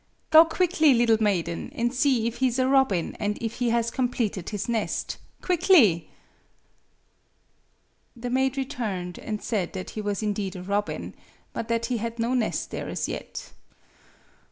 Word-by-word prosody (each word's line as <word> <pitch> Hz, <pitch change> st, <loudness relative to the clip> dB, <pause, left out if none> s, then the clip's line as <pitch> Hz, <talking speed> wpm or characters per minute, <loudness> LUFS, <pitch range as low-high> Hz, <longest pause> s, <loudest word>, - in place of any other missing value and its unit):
Go 315 Hz, +1 st, +9 dB
quickly, 325 Hz, -4 st, +3 dB
little 230 Hz, -2 st, +3 dB
maiden, 170 Hz, -5 st, 0 dB
and 240 Hz, +1 st, 0 dB
see 255 Hz, -3 st, +2 dB
if 235 Hz, 0 st, -2 dB
he 260 Hz, -, +3 dB
is 245 Hz, 0 st, -1 dB
a 255 Hz, 0 st, +2 dB
robin, 265 Hz, -10 st, +2 dB
and 210 Hz, 0 st, -1 dB
if 225 Hz, -1 st, -4 dB
he 245 Hz, -1 st, +1 dB
has 235 Hz, 0 st, +1 dB
completed 235 Hz, -7 st, -1 dB
his 205 Hz, -2 st, -4 dB
nest 230 Hz, -2 st, -2 dB, 0.3 s
quickly." 310 Hz, -, +4 dB, 2.1 s
The 245 Hz, +1 st, -5 dB
maid 265 Hz, +1 st, +1 dB
returned, 200 Hz, -9 st, -3 dB
and 215 Hz, -1 st, -5 dB
said 205 Hz, -6 st, -1 dB
that 185 Hz, -1 st, -6 dB
he 215 Hz, -, -4 dB
was 205 Hz, 0 st, -2 dB
indeed 205 Hz, -3 st, -2 dB
a 180 Hz, -, -6 dB
robin, 200 Hz, +2 st, -2 dB, 0.4 s
but 230 Hz, -, -4 dB
that 230 Hz, 0 st, 0 dB
he 245 Hz, 0 st, -1 dB
had 230 Hz, +1 st, -4 dB
no 235 Hz, +2 st, 0 dB
nest 245 Hz, -4 st, -1 dB
there -, -, -4 dB
as -, -, -2 dB
yet. -, -, -6 dB
230 Hz, 160 wpm, -26 LUFS, 205-255 Hz, 2.1 s, Go